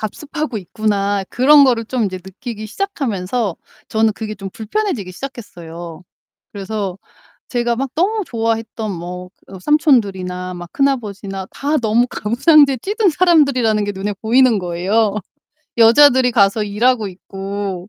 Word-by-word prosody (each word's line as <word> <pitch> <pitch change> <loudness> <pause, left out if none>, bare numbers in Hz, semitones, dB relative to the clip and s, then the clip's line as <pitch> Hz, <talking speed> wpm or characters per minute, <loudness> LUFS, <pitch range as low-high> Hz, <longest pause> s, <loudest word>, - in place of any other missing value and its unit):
답습하고 290 +4 -4
있구나.' 200 0 -1
그런 280 +3 +6
거를 235 -3 +2
좀 240 0 -1
이제 190 -2 -3
느끼기 215 +4 -8
시작하면서 230 - -2 0.3
저는 220 0 +2
그게 215 -1 -5
좀 195 -1 -7
불편해지기 225 - -3
시작했어요. 175 - -9 0.5
그래서 200 -2 -4 0.5
제가 240 -1 0
막 270 +1 -2
너무 410 +6 +1
좋아했던 225 -2 -2
뭐 180 +1 -7 0.2
어 190 - -10
삼촌들이나 190 - +1
막 175 -1 -9
큰아버지나 205 -8 -2
다 295 +2 -1
너무 235 0 +2
가부장제에 275 +5 +3
찌든 415 0 +1
사람들이라는 280 - +3
게 205 - -2
눈에 200 +1 -4
보이는 240 +1 +4
거예요. 195 +4 0 0.6
여자들이 250 +2 +6
가서 205 -1 +3
일하고 220 +2 +1
있고 195 0 -6
220 Hz, 330 characters per minute, -18 LUFS, 195-260 Hz, 0.6 s, 그런